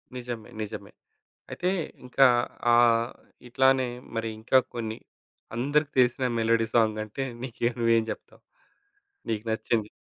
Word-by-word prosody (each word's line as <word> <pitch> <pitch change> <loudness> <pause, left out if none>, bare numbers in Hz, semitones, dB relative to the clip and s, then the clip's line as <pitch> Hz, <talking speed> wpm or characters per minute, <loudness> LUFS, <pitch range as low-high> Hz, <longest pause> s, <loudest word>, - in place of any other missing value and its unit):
నిజమే. 120 -2 -6
నిజమే. 105 - -6 0.6
అయితే 180 - -2 0.4
ఇంకా 135 +2 +5 0.5
ఆహ్, 120 0 +4 0.4
ఇట్లానే 130 0 +3 0.3
మరి 115 0 -1
ఇంకా 125 +4 +4 0.2
కొన్ని, 110 -1 -4 0.6
అందరికి 145 +4 +1
తెలిసిన 125 +1 +3
మెలోడీ 115 0 +2
సాంగంటే 110 +3 +1 0.2
నీకేం 120 -1 -1
నువ్వేం 115 -1 +3
జేప్తావు? - - -9 0.9
నీకు 110 0 -2
నచ్చింది. 110 -1 -1
115 Hz, 110 wpm, -27 LUFS, 110-125 Hz, 0.9 s, ఇంకా